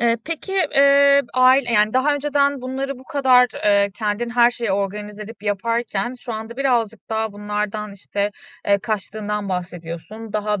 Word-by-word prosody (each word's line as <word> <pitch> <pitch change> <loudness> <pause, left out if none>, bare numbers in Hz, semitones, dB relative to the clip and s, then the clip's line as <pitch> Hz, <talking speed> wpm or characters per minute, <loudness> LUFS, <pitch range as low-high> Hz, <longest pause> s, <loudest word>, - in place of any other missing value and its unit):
Eee, 235 -1 +3
peki, 330 +4 -5 0.2
eee, 280 0 +6
ail 255 +1 +5
yani 210 +1 +3
daha 285 +3 +3
önceden 285 -1 +1
bunları 265 +1 -4
bu 260 - -15
kadar, 260 -5 +4 0.2
eee, 200 -1 +4
kendin 220 +2 -2
her 240 0 +5
şeyi 235 -5 -2
organize 205 +1 -3
edip 215 -1 -11
yaparken 225 +2 -1
şu 240 - -7
anda 220 +2 -6
birazcık 230 -7 0
daha 220 -1 -1
bunlardan, 210 0 -4
işte, 200 +1 -3 0.4
eee, 200 0 +4
kaçtığından 210 0 -3
bahsediyorsun. 180 +4 -6
Daha 210 -1 -1
220 Hz, 155 wpm, -21 LUFS, 205-255 Hz, 0.4 s, eee